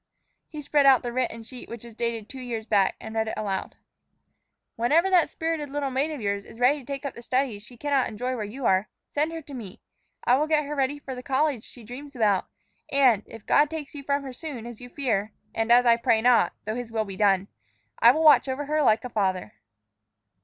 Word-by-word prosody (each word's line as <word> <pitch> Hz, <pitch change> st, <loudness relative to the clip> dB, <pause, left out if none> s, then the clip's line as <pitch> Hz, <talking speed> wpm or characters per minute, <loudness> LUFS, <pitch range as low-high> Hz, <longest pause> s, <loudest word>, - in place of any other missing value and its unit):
He 305 Hz, -2 st, -7 dB
spread 285 Hz, 0 st, +3 dB
out 265 Hz, -3 st, +6 dB
the 240 Hz, -1 st, -4 dB
written 240 Hz, -2 st, -2 dB
sheet, 250 Hz, +2 st, -10 dB
which 235 Hz, -1 st, -8 dB
was 235 Hz, -1 st, -11 dB
dated 230 Hz, -1 st, -3 dB
two 265 Hz, -, -9 dB
years 230 Hz, -3 st, -4 dB
back, 200 Hz, -3 st, +2 dB
and 220 Hz, -, -8 dB
read 220 Hz, 0 st, 0 dB
it -, -, -3 dB
aloud. 195 Hz, -3 st, -3 dB, 1.0 s
"'Whenever 315 Hz, +11 st, +3 dB
that 355 Hz, -3 st, +4 dB
spirited 320 Hz, -3 st, -3 dB
little 280 Hz, -1 st, -2 dB
maid 270 Hz, +4 st, 0 dB
of 305 Hz, -3 st, -5 dB
yours 200 Hz, -2 st, -2 dB
is 225 Hz, -, -14 dB
ready 265 Hz, +4 st, +4 dB
to 265 Hz, -, -14 dB
take 275 Hz, +1 st, -5 dB
up 280 Hz, -, -3 dB
the 235 Hz, -, -10 dB
studies 250 Hz, -3 st, -1 dB
she 240 Hz, +3 st, -13 dB
cannot 280 Hz, 0 st, +1 dB
enjoy 250 Hz, +4 st, -3 dB
where 225 Hz, -, -3 dB
you 235 Hz, +5 st, -6 dB
are, 190 Hz, +2 st, +2 dB, 0.2 s
send 300 Hz, +3 st, 0 dB
her 325 Hz, -1 st, -6 dB
to 280 Hz, -, -11 dB
me. 215 Hz, -8 st, -8 dB, 0.4 s
I 250 Hz, -, +4 dB
will 300 Hz, +2 st, +1 dB
get 305 Hz, -1 st, +2 dB
her 295 Hz, -, -4 dB
ready 275 Hz, 0 st, 0 dB
for 280 Hz, -2 st, -7 dB
the 250 Hz, -, -7 dB
college 270 Hz, -2 st, 0 dB
she 240 Hz, -, -12 dB
dreams 270 Hz, +5 st, -10 dB
about, 210 Hz, -5 st, +2 dB, 0.4 s
and, 260 Hz, -7 st, +4 dB
if 225 Hz, -2 st, -12 dB
God 295 Hz, 0 st, +4 dB
takes 310 Hz, -3 st, -6 dB
you 290 Hz, -, -7 dB
from 280 Hz, 0 st, -1 dB
her 265 Hz, -2 st, -7 dB
soon, 255 Hz, -4 st, -7 dB
as 240 Hz, -1 st, -9 dB
you 245 Hz, -, -9 dB
fear, 220 Hz, -7 st, -1 dB, 0.2 s
and 225 Hz, +1 st, 0 dB
as 245 Hz, +1 st, +6 dB
I 235 Hz, -1 st, +6 dB
pray 230 Hz, -1 st, +2 dB
not 245 Hz, +1 st, +4 dB
(though 215 Hz, -, -2 dB
His 240 Hz, -1 st, -5 dB
will 220 Hz, -1 st, -1 dB
be 195 Hz, -1 st, -7 dB
done!), 195 Hz, -1 st, +2 dB, 0.5 s
I 235 Hz, -, +8 dB
will 310 Hz, +6 st, +3 dB
watch 300 Hz, -2 st, +7 dB
over 265 Hz, +2 st, -3 dB
her 305 Hz, +1 st, +1 dB
like 220 Hz, -5 st, +3 dB
a 250 Hz, -, -5 dB
father.'" 190 Hz, -5 st, -1 dB
250 Hz, 235 wpm, -26 LUFS, 220-285 Hz, 1.0 s, I